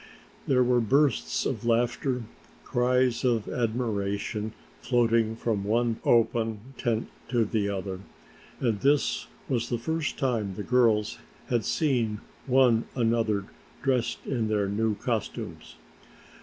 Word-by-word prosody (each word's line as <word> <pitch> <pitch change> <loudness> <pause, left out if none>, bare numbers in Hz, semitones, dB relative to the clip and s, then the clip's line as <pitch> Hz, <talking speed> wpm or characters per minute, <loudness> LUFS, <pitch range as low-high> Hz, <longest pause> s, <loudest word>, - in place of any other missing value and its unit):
There 125 -1 +4
were 125 0 +3
bursts 140 +6 +2
of 115 -4 -2
laughter, 120 +2 +1 0.4
cries 125 -1 +1
of 120 -4 +1
admiration 110 -2 -2 0.3
floating 115 -2 +2
from 110 -3 -1
one 115 +2 +1
open 115 -2 +2 0.2
tent 115 -2 -1 0.2
to 120 -2 +2
the 105 -1 0
other, 95 -1 -4 0.6
for 120 - +2
this 140 +7 +1 0.2
was 120 -3 -1
the 120 - 0
first 160 +5 -2
time 110 -8 -1
the 105 - -4
girls 115 -4 +2 0.3
had 120 -3 +1
seen 120 -9 0 0.3
one 125 -3 +4
another 115 -4 +1 0.4
dressed 125 -3 0
in 115 -4 -1
their 105 -2 +1
new 105 +2 0
costumes. 115 0 -4
115 Hz, 120 wpm, -27 LUFS, 110-125 Hz, 0.6 s, There